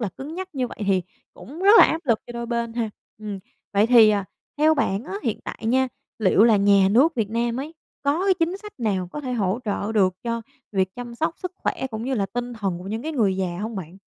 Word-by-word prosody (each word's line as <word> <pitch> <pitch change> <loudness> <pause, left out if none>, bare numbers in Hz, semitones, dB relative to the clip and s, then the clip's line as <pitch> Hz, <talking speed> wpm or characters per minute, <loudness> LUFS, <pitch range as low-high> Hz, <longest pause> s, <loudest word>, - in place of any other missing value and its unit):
là 220 - -1
cứng 290 +4 -7
nhắc 375 +1 -5
như 255 -2 0
vậy - - -11
thì 190 -2 +2 0.3
cũng 315 +8 -10
rất 400 - +6
là - - +10
áp 320 - 0
lực 230 -4 +3
cho - - -8
đôi 235 0 -5
bên 235 -1 -2
ha. 230 -2 -2 0.3
Ừm, 210 -2 -5 0.3
vậy 205 +1 +4
thì, 230 -3 +7
à, 205 -2 0 0.3
theo 310 +1 +5
bạn 220 -6 0
á 355 - -6
hiện 230 -7 -2
tại - - -6
nha, 260 +3 +2 0.3
liệu 210 0 +4
là 225 -2 +6
nhà 200 -1 +5
nước 275 +10 +4
Việt 220 -5 -1
Nam 235 +2 -1
ấy 305 +4 -7 0.3
có 290 +6 +1
cái 390 -1 +4
chính 350 +1 0
sách 420 +1 -10
nào 195 -6 0
có 295 - -4
thể 255 -3 -4
hỗ 205 -3 0
trợ 205 0 -2
được 190 -4 +3
cho 230 -1 -2 0.3
việc 190 -1 0
chăm 240 -1 -7
sóc 320 +6 -1
sức 365 -1 -5
khỏe 265 - -2
cũng 220 0 -5
như 265 +1 -1
là 200 -5 0
tinh 245 +5 -4
thần 195 -6 -3
của 180 - -10
những 220 +3 -3
cái 315 +2 -3
người 205 -9 +1
già 180 -2 -2
hông 220 +1 -4
bạn? 180 -1 -7
230 Hz, 255 wpm, -23 LUFS, 200-270 Hz, 0.3 s, là